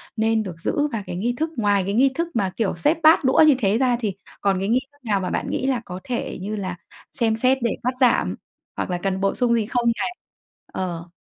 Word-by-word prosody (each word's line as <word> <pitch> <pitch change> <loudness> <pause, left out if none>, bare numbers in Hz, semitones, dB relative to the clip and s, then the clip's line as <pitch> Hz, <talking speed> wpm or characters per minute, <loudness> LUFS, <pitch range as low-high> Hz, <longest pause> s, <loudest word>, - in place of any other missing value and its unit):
nên 220 0 +1
được 185 -5 -6
giữ? 290 - 0
Và 215 -3 -2
cái - - -4
nghi 230 +7 -1
thức 315 +3 -1
ngoài 205 -3 +2
cái 200 - -2
nghi 260 +5 +4
thức 335 +3 -1
mà, 195 -4 +1
kiểu, 220 -6 0
xếp 235 - +2
bát 315 0 +6
đũa 260 +4 +5
như 290 - +6
thế 205 -2 +2
ra, 250 -1 +2
thì 215 -5 -2 0.3
còn 195 -2 +1
cái 195 +2 -2
nghi 240 +3 +4
thức 285 - -27
nào 205 -3 +1
mà 185 - -3
bạn - - -2
nghĩ 260 - -1
là 255 -3 0
có 180 +1 -7
thể, 245 -2 -3
như 210 +3 -3
là, 185 -3 -4 0.4
xem 230 -4 +1
xét 255 +4 +3
để 235 - +2
cắt 250 +2 0
giảm, 250 -3 +3 0.4
hoặc - - -2
là 180 - -1
cần 190 +1 -2
bổ 195 - +1
sung 245 -2 +2
gì 225 -2 +1
không 235 +1 +1
này? 360 - -2 0.6
Ờ. 175 -2 -4
225 Hz, 250 wpm, -23 LUFS, 195-250 Hz, 0.6 s, bát